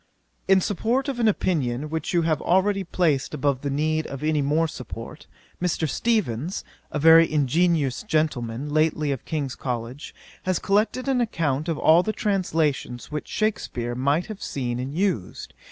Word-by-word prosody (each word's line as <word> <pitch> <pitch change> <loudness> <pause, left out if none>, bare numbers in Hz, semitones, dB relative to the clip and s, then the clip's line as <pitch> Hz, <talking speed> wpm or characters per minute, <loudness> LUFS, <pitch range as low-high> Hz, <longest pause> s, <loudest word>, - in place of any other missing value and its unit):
'In 190 0 +5
support 235 +8 0
of 270 -3 -3
an 230 - +3
opinion 150 - 0
which 160 -2 -2
you 170 -2 +2
have 160 -2 +1
already 195 +2 +2
placed 155 -6 0
above 140 -2 0
the 145 - -2
need 155 +3 0
of 140 +1 -7
any 155 -1 +1
more 150 +4 +2
support, 125 +1 -9 0.3
Mr. 170 -2 0
Steevens, 175 - -1 0.3
a - - -3
very 160 +2 +7
ingenious 150 -1 +2
gentleman, 145 - -1
lately 155 0 +1
of 135 - -4
King's 145 -5 -2
College, 125 +2 -5 0.3
has 185 -1 0
collected 215 +6 0
an 260 -2 +2
account 160 - -1
of 160 - -1
all 160 +3 +5
the 215 +4 -2
translations 160 - -1
which 150 0 -4
Shakspeare 125 - -2
might 140 +7 +1
have 215 -2 -8
seen 125 -3 -3
and 130 +2 -4
used. 170 - -2
155 Hz, 160 wpm, -24 LUFS, 135-185 Hz, 0.3 s, very